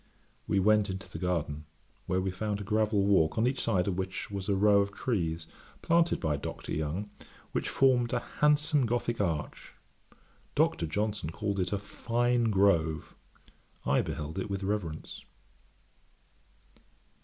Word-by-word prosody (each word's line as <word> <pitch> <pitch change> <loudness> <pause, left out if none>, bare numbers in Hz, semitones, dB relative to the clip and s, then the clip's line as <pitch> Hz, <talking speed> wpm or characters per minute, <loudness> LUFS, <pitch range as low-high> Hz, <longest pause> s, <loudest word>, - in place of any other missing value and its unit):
We 100 - +2
went 105 +1 +4
into 95 +2 -5
the - - -8
garden, 80 -4 -2 0.4
where 90 - +1
we 95 0 -1
found 105 +2 -2
a - - -5
gravel 105 -1 +1
walk, 95 -5 +3
on 110 - +3
each 130 +2 0
side 95 -5 +1
of 95 -1 -1
which 95 +2 -4
was 100 0 -4
a 100 - +3
row 100 +1 +5
of 100 0 -2
trees, 85 -8 -2 0.4
planted 170 0 +3
by 75 -2 0
Dr. - - -6
Young, 80 +7 -3 0.4
which - - -1
formed 125 -3 +3
a 125 - +1 0.2
handsome 150 -2 +3
Gothick 120 -1 -1
arch; 80 -6 -3 0.8
Dr. 80 - +2
Johnson 100 0 -2
called 100 +3 -2
it 90 -1 0
a 100 - +1
fine 120 +4 0
grove. 95 -7 +2 0.7
I - - +3
beheld 80 +5 -4
it 95 - -4
with 100 0 -3
reverence. 95 -6 -3
100 Hz, 150 wpm, -30 LUFS, 90-110 Hz, 0.8 s, row